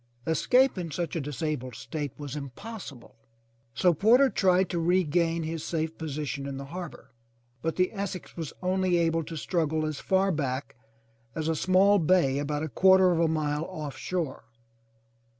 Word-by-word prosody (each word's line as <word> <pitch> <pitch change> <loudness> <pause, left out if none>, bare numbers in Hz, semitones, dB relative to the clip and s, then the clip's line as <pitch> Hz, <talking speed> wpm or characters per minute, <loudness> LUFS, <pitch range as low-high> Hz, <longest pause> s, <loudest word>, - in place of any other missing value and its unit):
Escape 245 - +3
in 170 -2 -4
such 170 +3 -3
a 165 - -1
disabled 140 -3 -3
state 145 +2 -5
was 145 -2 -6
im 140 -2 -5
possible, 170 - -10 0.6
so 180 -1 +4
Porter 240 - +5
tried 185 -1 +3
to 175 -1 -2
regain 170 -1 +1
his 160 0 -4
safe 160 -1 -2
position 145 -3 -4
in 135 -1 -5
the 140 - -6
harbor, 180 -3 -8 0.5
but 165 0 -2
the 185 +2 +1
Essex 195 -3 -5
was 160 -4 -5
only 185 -1 +2
able 165 -1 +1
to 160 +1 -7
struggle 155 -1 0
as 155 -2 -3
far 190 +1 +2
back 140 -4 -3 0.6
as 160 -1 -2
a 160 - +1
small 190 +5 +4
bay 160 -5 +3
about 145 +1 -2
a - - -1
quarter 190 +3 +5
of 170 - +1
a 165 - +3
mile 155 -1 -1
off 155 -7 -6
shore. 165 -1 -3
165 Hz, 170 wpm, -28 LUFS, 150-185 Hz, 0.6 s, Porter